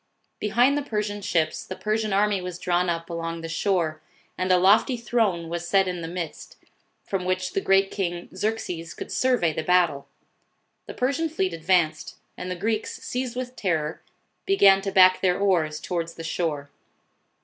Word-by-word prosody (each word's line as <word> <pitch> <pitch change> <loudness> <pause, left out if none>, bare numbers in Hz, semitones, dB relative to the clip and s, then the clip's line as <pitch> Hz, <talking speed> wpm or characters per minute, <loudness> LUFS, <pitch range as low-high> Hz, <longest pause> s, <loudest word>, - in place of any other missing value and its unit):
Behind 245 +6 +3
the 290 - 0
Persian 210 -6 -3
ships 165 -4 0
the 185 - -7
Persian 215 +1 -1
army 200 0 +2
was 180 -1 -6
drawn 180 0 0
up 165 0 -2
along 165 -1 -4
the 165 - -5
shore, 165 -2 -1 0.3
and 185 0 -1
a 180 - +6
lofty 205 +7 +4
throne 220 -8 0
was 170 +1 -4
set 195 +1 +3
in 180 -1 -3
the 165 - -5
midst, 170 -2 -6 0.5
from 195 -2 -3
which 185 0 -1
the 195 - 0
great 195 0 +3
King 175 -3 -3
Xerxes 185 -5 -3
could - - -7
survey 245 -11 +2
the 160 - -2
battle. 175 -5 +2 0.8
The - - -8
Persian 280 +6 0
fleet 190 - -1
advanced, 165 -2 0 0.2
and 180 - -6
the 180 - -2
Greeks, 215 +4 -2
seized 250 -1 -3
with 255 0 -5
terror, 160 -7 -2 0.5
began 195 - +6
to 195 0 -3
back 185 -1 +6
their 180 -2 +2
oars 170 -6 +1
towards 170 -2 -4
the 165 - -8
shore. 155 -4 -3
185 Hz, 170 wpm, -25 LUFS, 170-210 Hz, 0.8 s, a